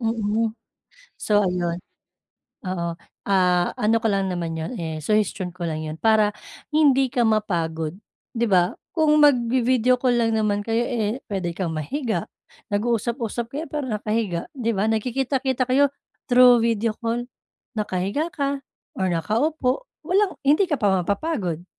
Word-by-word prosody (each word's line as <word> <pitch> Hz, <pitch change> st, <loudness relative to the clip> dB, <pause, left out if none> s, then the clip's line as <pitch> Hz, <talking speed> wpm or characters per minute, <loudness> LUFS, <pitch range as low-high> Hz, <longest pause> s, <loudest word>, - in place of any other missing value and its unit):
mm. 225 Hz, -1 st, 0 dB, 0.7 s
So 205 Hz, -2 st, +2 dB
ayun 175 Hz, -1 st, -1 dB, 0.8 s
oo 175 Hz, -3 st, -3 dB, 0.4 s
ah, 180 Hz, -2 st, +3 dB
ano 220 Hz, +2 st, +2 dB
ko 225 Hz, -, -1 dB
lang 195 Hz, -1 st, 0 dB
naman 170 Hz, -2 st, -3 dB
'yon 160 Hz, +10 st, -4 dB
eh, 160 Hz, -1 st, -4 dB
suhestyon 210 Hz, -3 st, 0 dB
ko 180 Hz, -1 st, -6 dB
lang 155 Hz, 0 st, -3 dB
'yon 155 Hz, 0 st, -5 dB
para 220 Hz, -2 st, +4 dB, 0.4 s
hindi 275 Hz, -4 st, +4 dB
ka 245 Hz, -3 st, +2 dB
mapagod 170 Hz, -6 st, -1 dB, 0.4 s
'di 235 Hz, +1 st, +1 dB
ba? 180 Hz, -2 st, +3 dB, 0.2 s
Kung 305 Hz, -2 st, +3 dB
magvi-video 250 Hz, -2 st, +4 dB
call 245 Hz, -2 st, +2 dB
lang 225 Hz, -1 st, +1 dB
naman 205 Hz, -1 st, +1 dB
kayo 230 Hz, +1 st, +1 dB
eh, 235 Hz, 0 st, -2 dB
puwede 185 Hz, -4 st, -2 dB
kang 175 Hz, -4 st, -2 dB
mahiga, 230 Hz, -, -2 dB, 0.5 s
nag-uusap-usap 235 Hz, +2 st, -1 dB
kayo 305 Hz, +4 st, -3 dB
pero 295 Hz, -1 st, -3 dB
nakahiga, 210 Hz, -5 st, -1 dB
'di 230 Hz, -2 st, -1 dB
ba? 210 Hz, +3 st, +1 dB
Nagkikita-kita 260 Hz, +3 st, 0 dB
kayo 280 Hz, +3 st, +4 dB, 0.4 s
through 245 Hz, -1 st, +7 dB
video 230 Hz, -1 st, +1 dB
call, 235 Hz, +1 st, -1 dB, 0.5 s
nakahiga 205 Hz, -, -1 dB
ka, 280 Hz, -1 st, -2 dB, 0.4 s
or 190 Hz, -1 st, 0 dB
nakaupo, 250 Hz, -, 0 dB, 0.2 s
walang 385 Hz, +2 st, +1 dB
hindi 300 Hz, +8 st, +4 dB
ka 295 Hz, -, +1 dB
pa 195 Hz, -3 st, +3 dB
mapapagod, 190 Hz, -, -2 dB
225 Hz, 140 wpm, -23 LUFS, 185-255 Hz, 0.8 s, through